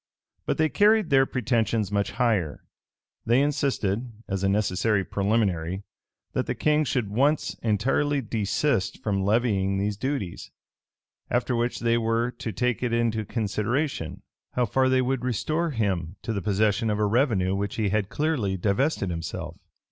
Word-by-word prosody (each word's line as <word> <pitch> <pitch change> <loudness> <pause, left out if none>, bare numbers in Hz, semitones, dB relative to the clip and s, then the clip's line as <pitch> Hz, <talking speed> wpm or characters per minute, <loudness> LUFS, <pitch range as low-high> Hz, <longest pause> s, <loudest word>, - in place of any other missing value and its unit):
But - - 0
they 155 - +3
carried 210 +1 +3
their 135 -1 +5
pretensions 115 -4 0
much 100 0 0
higher. 105 -11 0 0.6
They 120 +3 +3
insisted, 130 -6 0 0.2
as 100 -1 -2
a 95 - +3
necessary 100 0 +1
preliminary, 100 -3 0 0.5
that - - -1
the - - -1
king 155 0 +2
should 120 -6 -1
once 140 +7 +2
entirely 135 +7 +1
desist 110 0 0
from 100 -2 0
levying 100 -2 +1
these 100 +1 -1
duties; 130 -7 -3 0.8
after 120 +1 0
which 120 +1 -1
they 115 0 +2
were 115 +1 0
to 115 - -5
take 125 +2 -1
it 120 -2 -1
into 115 -2 +1
consideration, 110 - -2 0.3
how 125 - +2
far 130 +4 +2
they 130 0 +3
would 130 -1 -1
restore, 155 - 0
him 95 - -1
to 115 - -2
the 100 - -2
possession 105 +3 +1
of 105 - 0
a 105 - +2
revenue 105 -4 +2
of 100 - -1
which 100 0 -3
he 110 -3 0
had 105 0 0
clearly 135 -11 0
divested 100 - 0
himself. 80 -1 -5
110 Hz, 155 wpm, -26 LUFS, 100-130 Hz, 0.8 s, their